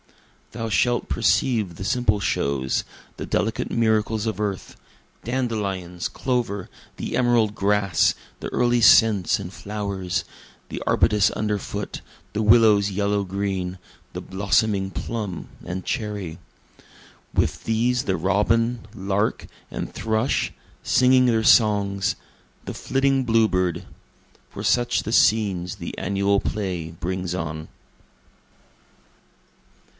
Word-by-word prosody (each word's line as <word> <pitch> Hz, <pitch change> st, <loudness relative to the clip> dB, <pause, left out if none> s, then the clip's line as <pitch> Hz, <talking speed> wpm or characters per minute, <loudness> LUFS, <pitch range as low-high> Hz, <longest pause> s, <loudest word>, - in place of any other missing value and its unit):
Thou 115 Hz, 0 st, -4 dB
shalt 120 Hz, +4 st, +1 dB
perceive 105 Hz, -2 st, +1 dB
the 95 Hz, -, -7 dB
simple 115 Hz, -3 st, +1 dB
shows, 70 Hz, -8 st, 0 dB, 0.3 s
the -, -, -5 dB
delicate 110 Hz, 0 st, -1 dB
miracles 110 Hz, -1 st, +1 dB
of 110 Hz, -1 st, -2 dB
earth, 100 Hz, -3 st, -3 dB, 0.5 s
Dandelions, 100 Hz, -8 st, -2 dB
clover, 120 Hz, -7 st, -2 dB, 0.3 s
the -, -, -4 dB
emerald 120 Hz, -4 st, +2 dB
grass, 100 Hz, -4 st, +2 dB, 0.3 s
the -, -, -4 dB
early 120 Hz, -1 st, +2 dB
scents 110 Hz, -2 st, +5 dB
and 95 Hz, -1 st, -7 dB
flowers, 100 Hz, -3 st, -3 dB, 0.4 s
The -, -, -5 dB
arbutus 105 Hz, -3 st, +3 dB
under 105 Hz, -1 st, 0 dB
foot, 100 Hz, +1 st, -6 dB, 0.3 s
the 105 Hz, -, -1 dB
willow's 105 Hz, -2 st, +5 dB
yellow 100 Hz, +1 st, 0 dB
green, 95 Hz, -1 st, -3 dB, 0.3 s
the -, -, -6 dB
blossoming 100 Hz, 0 st, +1 dB
plum 105 Hz, -4 st, -5 dB
and 90 Hz, +1 st, -5 dB
cherry; 105 Hz, -8 st, -3 dB, 0.9 s
With -, -, 0 dB
these 120 Hz, +3 st, +1 dB
the 95 Hz, -2 st, -1 dB
robin, 115 Hz, +5 st, +1 dB
lark 100 Hz, +1 st, -1 dB, 0.2 s
and -, -, -5 dB
thrush, 110 Hz, +3 st, 0 dB, 0.3 s
singing 130 Hz, 0 st, +4 dB
their 115 Hz, -2 st, +2 dB
songs 100 Hz, -4 st, +3 dB, 0.5 s
the -, -, -5 dB
flitting 135 Hz, 0 st, +1 dB
bluebird; 110 Hz, -7 st, +1 dB, 0.6 s
For -, -, -8 dB
such 120 Hz, -1 st, +2 dB
the 110 Hz, -, -3 dB
scenes 100 Hz, -7 st, +2 dB
the -, -, -7 dB
annual 100 Hz, +1 st, +1 dB
play 90 Hz, -6 st, -3 dB
brings 90 Hz, +2 st, -4 dB
on. 80 Hz, -2 st, -5 dB
105 Hz, 110 wpm, -23 LUFS, 95-115 Hz, 0.9 s, scents